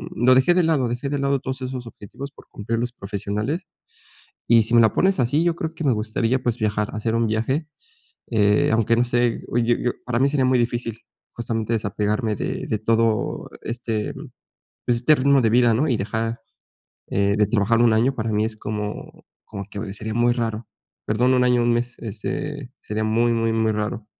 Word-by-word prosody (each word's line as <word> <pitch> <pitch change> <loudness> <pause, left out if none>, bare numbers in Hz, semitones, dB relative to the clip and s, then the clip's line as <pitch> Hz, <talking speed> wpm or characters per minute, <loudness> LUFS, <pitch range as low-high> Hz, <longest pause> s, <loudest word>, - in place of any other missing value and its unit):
lo 125 +3 +5
dejé 130 +7 +4
de 180 0 +3
lado. 150 -7 +2
Dejé 120 +4 -3
de 145 - -1
lado 140 0 +1
todos 130 +1 -5
esos 130 -1 -5
objetivos 135 +6 -9
por - - -18
cumplir 115 +2 -3
los 120 +1 -2
profesionales. 105 - -3 0.8
Y 115 -1 +6
sí 110 - -3
me - - +7
la 110 - +4
pones 190 -4 +2
así, 135 +6 +2
yo 170 -1 +1
creo 160 -1 -4
que 165 - -6
me 140 - +3
gustaría 115 +3 0
pues 120 -1 -1
viajar, 105 -1 0
hacer 110 +1 -1
un 115 0 +2
viaje, 115 +8 -1 0.6
eh, 105 -2 +3
aunque 115 0 +3
no 120 +1 +3
sé 120 -1 0
o, - - -3
eh, 120 - +3
yo 120 +1 +3
yo 125 - -1
para 120 -1 -1
mí 135 - +3
sería 140 -2 +1
muy 130 0 +3
difícil 120 -1 -2 0.3
justamente 115 -1 -3
desapegarme 105 +1 -1
de - - -3
de 110 - 0
todo 115 0 0
este 115 -2 -3 0.7
este 120 +5 +3
ritmo 140 0 +3
de 110 - +3
vida, 120 0 +4
¿no?, 145 +8 +1
y 125 - +2
dejar, 110 +3 -3 0.7
eh, 100 +1 +1
de 105 - +4
trabajar 115 +2 +2
un 120 -1 +5
año 120 +5 +2
para 110 0 -2
mí 105 +1 +1
es 110 -1 -4
como 105 0 -6 0.2
como 100 - -7
que 100 -1 -5
sería 110 +1 -5
muy 120 +1 +3
raro. 115 -2 -3 0.4
Perdón, 120 +4 +2
un 125 0 +3
año, 125 -1 +3
un 120 - +2
mes, 120 +1 -1
este 125 +5 -5
sería 110 +1 -3
muy, 115 +2 +2
muy, 115 -1 +1
muy 110 0 +1
raro. 105 +1 -3
115 Hz, 200 wpm, -22 LUFS, 110-125 Hz, 0.8 s, me